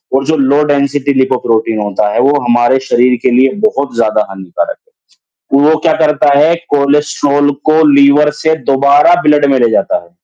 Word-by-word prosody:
और 135 +1 -1
जो 160 - 0
low 140 +1 +1
density 140 -1 -1
lipoprotein 120 -4 -1
होता 105 0 -2
है, - - -1
वो 140 +2 +1
हमारे 120 +1 +1
शरीर 125 -1 0
के - - +1
लिए 130 +2 +2 0.2
बहुत 140 - -3
ज़्यादा 110 -2 0
हानिकारक 95 - -6
है, 475 - -37 0.6
तो 140 - +2
वो 160 - +3
क्या 160 - +3
करता 150 -1 +1
है 155 +3 +3 0.2
कोलेस्ट्रॉल 145 0 0 0.2
को 160 +1 +3
लीवर 140 +2 +3
से 160 0 +1
दोबारा 140 +4 +3
ब्लड 150 -1 +2
में - - +1
ले 120 - +2
जाता 110 - -1
है, 85 - -23
140 Hz, 180 wpm, -11 LUFS, 125-145 Hz, 0.6 s, वो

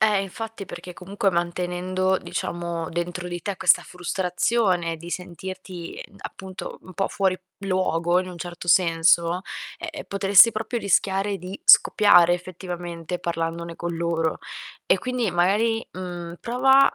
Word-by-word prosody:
eh, 210 -2 +3
infatti, 215 +2 -6
perché 180 - -9
comunque 195 +3 -1
mantenendo, 180 +2 -1
diciamo, 170 -1 -4
dentro 175 +1 -3
di 175 0 -5
te 200 -2 -3
questa 185 -1 +4
frustrazione 180 0 0
di 170 +2 -10
sentirti 180 0 -7
ind 200 - -20
appunto, 190 -1 -8
un 185 - -12
po' 195 - 0
fuori 190 -2 +1 0.3
luogo 180 -2 +1
in 185 - -6
un 180 -1 -9
certo 175 0 -7
senso, 170 0 +4 0.4
ehm 340 -1 -6
ehm, 310 - -8
potresti 200 +3 +6
proprio 220 +3 -3
rischiare 195 0 +1
di 185 - -8
scoppiare 205 - +7
effettivamente 175 -1 -5
parlandone 170 0 -3
con 170 0 -4
loro. 165 -1 -1 0.5
E - - +4
quindi 250 -3 -1
magari, 210 +6 +2
mhmm, 175 -2 -7
prova 265 +3 +4
180 Hz, 140 wpm, -24 LUFS, 175-200 Hz, 0.5 s, scoppiare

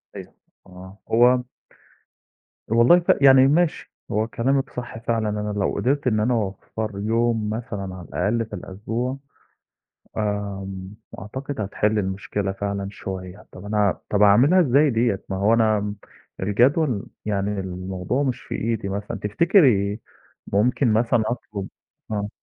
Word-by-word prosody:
أيوه، - - -10 0.3
آه، 95 +2 -12
هو 125 +2 +5 1.2
والله 120 +10 +5
ف 170 - +2
يعني 135 -1 +7
ماشي، 165 +3 +1 0.2
هو 110 +2 0
كلامِك 135 +4 0
صح 120 -2 -7
فعلًا، 115 -1 -1
أنا 105 0 -3
لو - - 0
قدِرت 140 +2 0
إن 110 -3 +2
أنا 120 +4 +1
أوفّر 110 +1 -3
يوم 115 0 0
مثلًا 105 -4 -5
على 90 -2 -10
الأقل 115 +2 0
في - - -17
الأسبوع 115 +7 -4 1.0
آمم، 100 -2 -4 0.3
أعتقد 130 +5 -6
هتحِل 105 +2 0
المشكلة 95 +1 -2
فعلًا 100 0 -3
شوية. 95 0 -7
طَب 95 - -11
أنا 105 -2 +1
طَب 105 0 +1
أعملها 125 - +6
إزاي 145 +1 +4
دِيّة؟ 115 -4 0
ما 95 - -2
هو 105 +3 +3
أنا 110 -2 +3
م 105 0 -4 0.4
الجدول 120 - +2 0.2
يعني 100 -1 -1
الموضوع 95 +7 -3
مش 130 -3 -2
في - - -6
إيدي 110 -3 -2
مثلًا 100 +1 -4
تفتكري 110 - +3 0.5
ممكن 120 +3 +2
مثلًا 115 +1 +2
أطلُب 105 -5 -5 0.4
آه. 105 -1 -2
105 Hz, 135 wpm, -23 LUFS, 100-120 Hz, 1.2 s, يعني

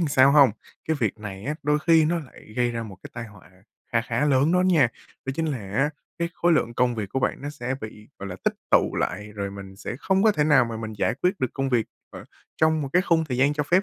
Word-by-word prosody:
là 165 - +1
sao 135 0 +5
hông? 140 -4 +7 0.4
Cái 160 - +2
việc 110 -2 0
này 100 -2 -7
á, 150 - -2
đôi 150 +1 +2
khi 165 -2 +6
nó 170 +3 +1
lại 135 -7 -12
gây 120 -1 +2
ra 115 -1 -3
một 100 -4 -9
cái - - -10
tai 115 - -5
họa 100 -5 -16 0.4
kha 115 - +3
khá 115 +4 -1
lớn 140 +3 +3
đó 180 - +4
nha. 170 -9 +4 0.4
Đó 135 - -2
chính 165 - 0
là 145 -5 -2
á, 110 +8 -1 0.3
cái 170 - 0
khối 175 0 +2
lượng 120 -6 +1
công 125 0 +2
việc 105 -3 -4
của 135 - -2
bạn 125 - -1
nó 145 - -4
sẽ 135 -3 -4
bị, 105 0 -9
gọi 100 - -6
là, 90 - -6
tích - - +2 0.2
tụ - - +4
lại, 105 0 -3
rồi 100 -1 -4
mình 100 -1 -10
sẽ 100 +4 -6
không 190 +3 +2
có 220 0 +5
thể 150 -6 +1
nào 150 -5 +5
mà 115 -1 -5
mình 110 -1 -5
giải 110 - +1
quyết 185 +2 +1
được 130 - -1
công 135 -1 -1
việc 120 -4 +1 0.2
ở - - -10 0.3
trong 160 -1 +2
một 140 - -3
cái 180 +1 +4
khung 170 -4 +2
thời 130 -5 -3
gian 140 +3 +3
cho 150 - 0
phép 175 +6 +3
130 Hz, 280 wpm, -25 LUFS, 110-155 Hz, 0.4 s, hông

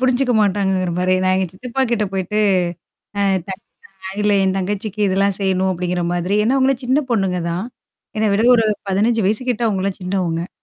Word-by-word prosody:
புரிஞ்சுக்க 255 0 +2
மாட்டாங்கங்கிற 190 -3 0
மாரி. 185 +1 +2
நான் 185 0 +2
எங்க 190 -1 0
சித்தப்பா 250 +6 -3
கிட்ட 215 -3 +1
போயிட்டு. 195 +2 -2 0.8
அ - - +1 0.3
தப் 190 +3 -6 0.5
அ - - -4
இல்ல 210 0 +2
என் 190 0 +1
தங்கச்சிக்கு 205 +2 -3
இதெல்லாம் 195 0 +1
செய்யணும் 190 -1 +1
அப்டிங்கிற 180 0 -2
மாதிரி. 180 +4 0
ஏன்னா 265 +4 +2
அவங்கள 270 0 +3
சின்ன 275 +4 +2
பொண்ணுங்கதான்? 180 -3 -1 0.5
என்ன 215 0 +2
விட 215 - +2
ஒரு 225 - +2 0.2
15 215 +3 +1
வயசு 215 +4 0
கிட்ட 235 0 -3
அவங்கலாம் 195 -1 -2
சின்னவங்க. 180 -2 -2
195 Hz, 170 wpm, -19 LUFS, 185-220 Hz, 0.8 s, அவங்கள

